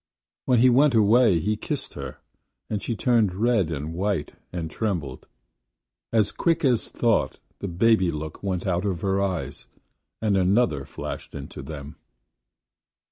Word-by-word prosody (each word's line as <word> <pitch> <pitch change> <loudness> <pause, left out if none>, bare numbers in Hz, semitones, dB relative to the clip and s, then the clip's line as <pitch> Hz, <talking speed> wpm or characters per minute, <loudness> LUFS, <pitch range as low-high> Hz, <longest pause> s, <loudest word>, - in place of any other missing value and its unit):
When 125 - +3
he 125 +2 +6
went 135 +1 +4
away 110 -2 +5
he 105 +6 0
kissed - - -4
her, - - -7 0.5
and 105 -2 -1
she 115 - -2
turned 110 -5 +2
red 110 -4 +2
and 80 0 -4
white 95 -3 -1 0.2
and 80 -3 -4
trembled. 85 - -3 0.8
As 110 -3 +2
quick 165 -3 +1
as 125 -4 +2
thought - - +1 0.2
the 100 - -4
baby 95 +1 +3
look 80 -1 -5
went 95 -3 -2
out 90 -1 0
of 95 -5 -2
her 100 0 +1
eyes 95 -4 -3 0.5
and 105 -3 +1
another 95 - +2
flashed - - -7
into - - -7
them. 75 -2 -8
100 Hz, 145 wpm, -25 LUFS, 85-115 Hz, 0.8 s, he